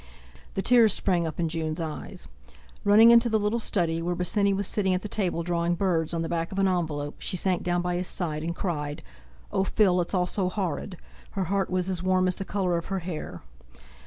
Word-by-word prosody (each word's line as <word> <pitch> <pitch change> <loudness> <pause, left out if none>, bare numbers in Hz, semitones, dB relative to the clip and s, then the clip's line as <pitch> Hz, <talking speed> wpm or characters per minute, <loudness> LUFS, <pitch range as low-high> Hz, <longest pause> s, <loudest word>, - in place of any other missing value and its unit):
The 195 - -1
tears 235 -4 +5
sprang 175 -4 +1
up 160 - -6
in 170 - +1
Jun's 160 0 -2
eyes; 155 - -6 0.6
running 215 +3 +7
into 235 0 +6
the 220 - +2
little 210 +2 0
study, 170 -7 0
where 175 +1 -1
Bosinney 200 +3 +2
was 200 +1 0
sitting 190 -1 +1
at 180 - -3
the - - -3
table 185 -5 -1
drawing 170 0 0
birds 170 -3 0
on 165 -1 -1
the - - -3
back 165 0 -2
of 195 - -6
an 195 0 +3
envelope, 155 -6 -2
she 185 - -2
sank 185 0 +1
down 175 0 0
by 180 0 -1
his 180 0 -3
side 155 -5 -3
and 170 +2 -3
cried: 150 -6 -3 0.5
"Oh, 190 - +1
Phil! 190 -2 +3
it's 175 - -3
all 180 -1 +2
so 185 0 0
horrid!" 185 -1 -3 0.4
Her 195 - -1
heart 195 +2 -1
was 185 0 0
as 185 -3 -1
warm 185 0 +2
as 185 - 0
the 195 - -5
colour 185 -4 0
of 170 - -10
her 195 - -2
hair. 170 -4 -6
180 Hz, 220 wpm, -26 LUFS, 170-195 Hz, 0.6 s, running